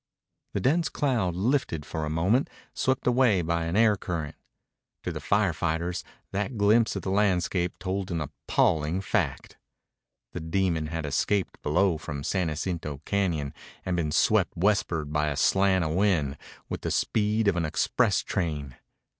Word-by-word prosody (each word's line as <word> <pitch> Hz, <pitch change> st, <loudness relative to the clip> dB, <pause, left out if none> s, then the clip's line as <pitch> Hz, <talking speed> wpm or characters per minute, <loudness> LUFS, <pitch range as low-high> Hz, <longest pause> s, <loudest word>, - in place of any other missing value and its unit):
The -, -, 0 dB
dense 160 Hz, +5 st, +2 dB
cloud 115 Hz, -12 st, 0 dB
lifted 100 Hz, -, 0 dB
for 75 Hz, +2 st, -3 dB
a -, -, -3 dB
moment, 90 Hz, -, +2 dB, 0.2 s
swept 130 Hz, 0 st, 0 dB
away 120 Hz, -7 st, +3 dB
by 85 Hz, 0 st, 0 dB
an 85 Hz, +2 st, -2 dB
air 110 Hz, -2 st, +5 dB
current. 85 Hz, -6 st, -4 dB, 0.7 s
To -, -, -2 dB
the -, -, -5 dB
fire 100 Hz, -4 st, +2 dB
fighters 85 Hz, +3 st, -2 dB, 0.3 s
that 105 Hz, +5 st, -2 dB
glimpse 110 Hz, +3 st, +3 dB
of -, -, -4 dB
the 95 Hz, -, -2 dB
landscape 90 Hz, -3 st, +1 dB
told 95 Hz, +1 st, -3 dB
an 85 Hz, -2 st, -1 dB
appalling 75 Hz, +3 st, 0 dB
fact. -, -, -2 dB, 0.7 s
The -, -, -5 dB
demon 80 Hz, -1 st, 0 dB
had 80 Hz, 0 st, -4 dB
escaped 90 Hz, +7 st, 0 dB
below 90 Hz, -3 st, +2 dB
from 70 Hz, -2 st, -6 dB
San 90 Hz, +2 st, 0 dB
Jacinto 75 Hz, -2 st, -3 dB
Cañon 85 Hz, -8 st, 0 dB, 0.3 s
and 90 Hz, -, 0 dB
been 80 Hz, -3 st, -1 dB
swept -, -, +2 dB
westward 85 Hz, -5 st, +1 dB
by 75 Hz, 0 st, +1 dB
a 75 Hz, -, -2 dB
slant 95 Hz, -2 st, +3 dB
of 80 Hz, -, -1 dB
wind 85 Hz, -7 st, +1 dB, 0.3 s
with -, -, -5 dB
the -, -, -2 dB
speed 105 Hz, 0 st, +1 dB
of 100 Hz, -, +3 dB
an 85 Hz, -, 0 dB
express 80 Hz, -, +1 dB
train. 75 Hz, -7 st, -3 dB
90 Hz, 160 wpm, -27 LUFS, 80-100 Hz, 0.7 s, air